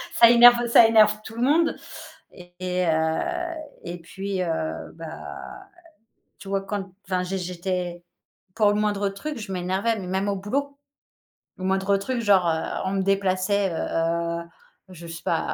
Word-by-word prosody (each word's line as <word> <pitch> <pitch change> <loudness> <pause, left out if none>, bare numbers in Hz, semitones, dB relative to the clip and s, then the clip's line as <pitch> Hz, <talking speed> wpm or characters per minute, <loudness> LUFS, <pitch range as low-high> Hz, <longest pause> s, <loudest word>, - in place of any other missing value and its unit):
ça 235 -8 +8
énerve 240 0 +7
ça 230 -1 +7
énerve 215 -1 +5
tout 225 - -9
le 235 - -1
monde 320 +5 +3 0.6
et 175 0 -15 0.3
heu - - +3 0.9
et 175 +1 -6
puis, 195 +1 -4
heu, 160 -2 -3
bah, 165 -1 -9 0.8
tu - - -12
vois, 195 0 0
quand, 195 0 -5
enfin, 185 -1 -1
j'ai 190 +1 -3
j'étais 180 -1 -4 0.5
pour 215 -2 +4
le - - 0
moindre 205 -1 0
truc, 285 +8 -6
je 210 -3 -7
m'énervais, 190 +5 -1
mais 185 - -7
même 190 +2 -1
au 200 - 0
boulot. 280 +8 -3 0.8
Le 185 - -8
moindre 190 +1 +1
truc, 240 +5 -3
genre, 195 -5 +4
heu, 160 0 0 0.2
on 190 - -1
me 195 - 0
déplaçait, 195 0 +1
heu-heu, 170 +1 -1 0.5
je 170 -2 -11
sais 165 0 -8
pas, - - +1
195 Hz, 160 wpm, -24 LUFS, 180-210 Hz, 0.9 s, ça